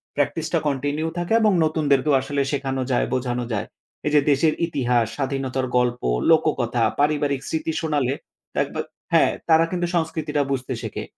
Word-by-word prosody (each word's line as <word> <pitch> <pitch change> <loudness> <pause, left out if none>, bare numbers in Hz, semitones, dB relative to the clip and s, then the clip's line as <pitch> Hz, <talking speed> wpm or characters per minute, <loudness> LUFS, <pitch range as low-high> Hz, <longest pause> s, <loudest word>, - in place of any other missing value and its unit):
প্র্যাকটিসটা 160 +3 0
কন্টিনিউ 145 +3 -1
থাকে 175 +4 -1
এবং 215 -1 +4
নতুনদেরকেও 150 -2 +2
আসলে 140 +1 -1
শেখানো 135 -2 -2
যায় 125 - +2
বোঝানো 125 -1 -1
যায়। 100 - -2 0.4
এই - - +1
যে - - +8
দেশের 155 +3 +3
ইতিহাস, 125 -7 +1
স্বাধীনতার 135 -1 -2
গল্প 125 0 +1 0.3
লোককথা, 130 -7 +2 0.2
পারিবারিক 145 -2 +1
স্মৃতি 160 0 -1
শোনালে 145 -5 0 0.4
দেখবে - - -1 0.3
হ্যাঁ, - - +5 0.2
তারা 160 0 +6
কিন্তু 175 -1 -1
সংস্কৃতিটা 160 -3 -1
বুঝতে 130 -1 -2
শেখে। - - -4
145 Hz, 145 wpm, -23 LUFS, 130-155 Hz, 0.4 s, যে